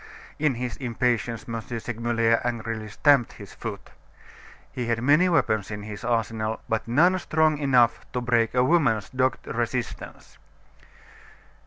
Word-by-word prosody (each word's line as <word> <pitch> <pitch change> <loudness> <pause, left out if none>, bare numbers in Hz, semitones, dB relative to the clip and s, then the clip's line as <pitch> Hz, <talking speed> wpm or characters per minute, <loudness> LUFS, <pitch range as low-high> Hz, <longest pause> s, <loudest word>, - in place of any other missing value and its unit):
In 150 -3 +1
his 125 0 -4
impatience, 120 -2 -1
M. 115 -1 -4
Segmuller 115 0 0
angrily 115 -2 -3
stamped 140 +2 +3
his - - -12
foot. - - -7 0.8
He 125 -2 -4
had 115 -1 0
many 150 +7 +4
weapons 110 - +1
in 105 -1 -6
his 105 +2 -8
arsenal; 115 -2 -1
but 110 0 -2
none 175 +10 +3
strong 155 -3 +1
enough 125 -5 +3
to 125 - -1
break 120 -1 +1
a 125 - +4
woman's 130 - +2
dogged 130 0 0
resistance. 120 -5 -5
120 Hz, 135 wpm, -25 LUFS, 115-130 Hz, 0.8 s, many